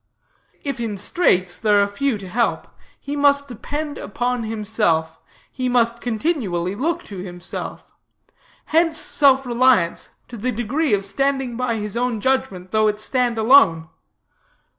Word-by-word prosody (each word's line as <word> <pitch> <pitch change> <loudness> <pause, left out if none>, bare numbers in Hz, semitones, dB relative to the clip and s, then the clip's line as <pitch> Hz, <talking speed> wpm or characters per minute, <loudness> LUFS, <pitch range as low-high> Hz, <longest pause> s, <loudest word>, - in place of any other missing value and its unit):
If 275 -4 -3
in 220 -3 -3
straits, 185 - +1
there 210 -2 +3
are 200 - +4
few 245 +4 -1
to 195 -2 -9
help; 230 +6 -1 0.3
he 285 +1 -5
must 285 0 +3
depend 290 +5 -5
upon 245 +3 -2
himself; 210 -8 -1 0.3
he 255 -1 -2
must 235 -1 +1
continually 220 - -1
look 330 +10 -2
to 200 - -9
himself. 175 -1 -7 0.7
Hence 325 0 +2
self 270 -3 +3
reliance, 240 -8 +2 0.2
to 245 - -9
the 250 +4 -2
degree 245 +3 0
of 195 -1 -3
standing 270 +4 -1
by 245 -1 -1
his 210 -1 -4
own 240 -2 -1
judgment, 205 -7 -1
though 215 0 +3
it 210 0 -1
stand 245 +1 0
alone. 220 - +5
235 Hz, 140 wpm, -21 LUFS, 205-270 Hz, 0.7 s, alone